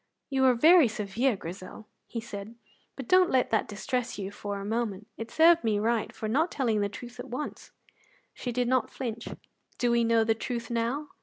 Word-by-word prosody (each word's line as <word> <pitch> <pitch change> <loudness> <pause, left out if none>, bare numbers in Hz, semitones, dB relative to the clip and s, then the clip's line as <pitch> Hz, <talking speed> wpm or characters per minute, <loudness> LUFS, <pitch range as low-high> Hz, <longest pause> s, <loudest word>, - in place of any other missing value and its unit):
"You 265 -1 +1
were 260 -1 +5
very 320 +4 +7
severe, 215 +3 0
Grizel," 185 +4 -9 0.2
he 235 - -4
said, 215 -1 -8 0.4
"but 270 -3 -7
don't 365 -1 +5
let 255 -1 +2
that 220 - +1
distress 240 +4 -3
you 195 -1 -4
for 205 -1 -5
a 200 - -6
moment; 215 -2 -2
it 225 0 -6
served 335 +4 +5
me 215 -2 +1
right 225 +1 0
for 215 - -5
not 300 +10 +2
telling 230 -6 0
the 200 - 0
truth 245 +4 -10
at 245 +1 -7
once." 255 +5 -6 0.6
She 245 - -4
did 245 0 0
not 255 -2 +2
flinch. 235 -3 -5 0.5
"Do 245 -1 +1
we 235 0 +3
know 230 -1 +3
the 225 0 +2
truth 235 +1 -5
now?" 240 +6 -1
235 Hz, 200 wpm, -28 LUFS, 215-255 Hz, 0.6 s, very